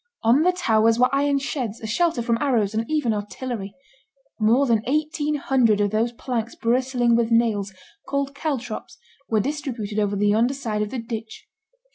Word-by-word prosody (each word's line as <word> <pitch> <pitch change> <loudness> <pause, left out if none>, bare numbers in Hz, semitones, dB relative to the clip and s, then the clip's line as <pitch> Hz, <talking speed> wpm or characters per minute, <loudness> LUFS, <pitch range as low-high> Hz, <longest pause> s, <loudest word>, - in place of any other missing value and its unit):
On 235 +6 +5
the 360 +3 +4
towers 225 -10 +2
were 250 +2 +3
iron 280 0 +2
sheds, 255 -5 -3
a - - -8
shelter 275 +3 +1
from 230 -1 0
arrows, 230 -8 +1
and 225 +1 -2
even 300 -7 +1
artillery. 210 0 -5 0.6
More 230 +6 +4
than 230 -4 +2
eighteen 300 +1 0
hundred 255 -7 +2
of 205 -1 +1
those 225 +2 +1
planks 235 -1 -4
bristling 245 0 +1
with 230 -1 +1
nails, 225 -4 +1 0.4
called 280 0 -1
caltrops, 275 -7 -4 0.3
were 220 - +2
distributed 240 -6 -3
over 205 -1 0
the 205 +1 +2
yonder 230 +6 +2
side 220 -6 -3
of 210 - -1
the 260 - -5
ditch. 225 -1 -6
235 Hz, 170 wpm, -23 LUFS, 220-275 Hz, 0.6 s, On